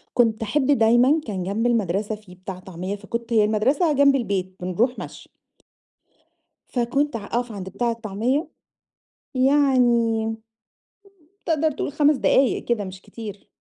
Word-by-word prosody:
كنت 230 -2 +2
أحب 265 +5 0
دايمًا 255 +3 +4
كان 190 -4 -3
جنب 205 +6 -1
المدرسة 210 -2 0
في 210 -4 -13
بتاع 185 0 -8
طعمية 185 +2 -6
فكنت 230 +3 -5
هي 215 -2 +5
المدرسة 265 +10 +2
جنب 280 -1 +4
البيت 190 -5 -2
بنروح 215 +8 0
مشي. - - -9 1.4
فكنت 255 +3 0
ع 205 - -7
أقف 240 +1 -2
عند 190 -2 -6
بتاع 240 +4 -1
الطعمية 230 - -1 0.9
يعني 250 -5 +3 1.2
تقدر 315 -1 +2
تقول 285 - -4
5 295 0 +3
دقايق 265 0 +2
كده 230 -4 0
مش 185 0 -9
كتير. 210 -3 -10
230 Hz, 130 wpm, -23 LUFS, 205-265 Hz, 1.4 s, هي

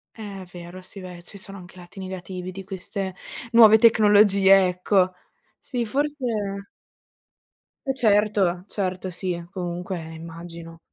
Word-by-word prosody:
È 200 -4 -8
vero. 175 +1 -10
Sì, 195 +2 -12
beh, 180 -2 -10
ci 200 +3 -12
sono 195 +1 -10
anche 180 -1 -13
i - - -13
lati 175 +3 -15
negativi 185 -1 -6
di 195 +1 -8
queste 190 0 -5 0.4
nuove 220 -1 +8
tecnologie, 205 -4 +6
ecco. 180 +1 +1 0.5
Sì, 245 -3 -3
forse 290 +2 -2 1.6
Eh 270 - +1
certo, 205 -6 +2
certo. 185 -2 -3
Sì, 180 -1 -4
comunque, 180 0 -4
immagino. 165 0 -10
190 Hz, 125 wpm, -24 LUFS, 180-205 Hz, 1.6 s, nuove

